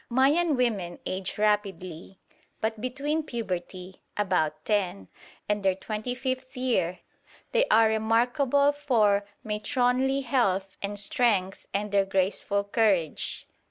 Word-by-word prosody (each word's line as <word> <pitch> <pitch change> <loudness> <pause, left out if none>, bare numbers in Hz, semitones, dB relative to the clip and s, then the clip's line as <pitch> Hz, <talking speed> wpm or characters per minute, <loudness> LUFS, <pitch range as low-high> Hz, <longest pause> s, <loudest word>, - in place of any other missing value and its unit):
Mayan 285 +6 +3
women 205 -9 0
age 185 0 -3
rapidly; 195 -4 -1 0.4
but 220 -1 -2
between 280 +5 -1
puberty 185 - -5 0.2
(about 160 -7 0
ten) 185 - -1 0.4
and 210 0 0
their 190 -1 +2
twenty 215 +5 -4
fifth 260 0 -4
year 235 -9 0 0.5
they - - +3
are 225 0 +5
remarkable 245 +6 +2
for 220 -9 +2 0.2
matronly 250 +5 +1
health 195 -7 0
and 205 +1 -3
strength 200 -2 +1
and 205 +1 -2
their 200 -1 +3
graceful 195 +1 0
carriage. 200 -6 0
210 Hz, 115 wpm, -27 LUFS, 195-255 Hz, 0.5 s, are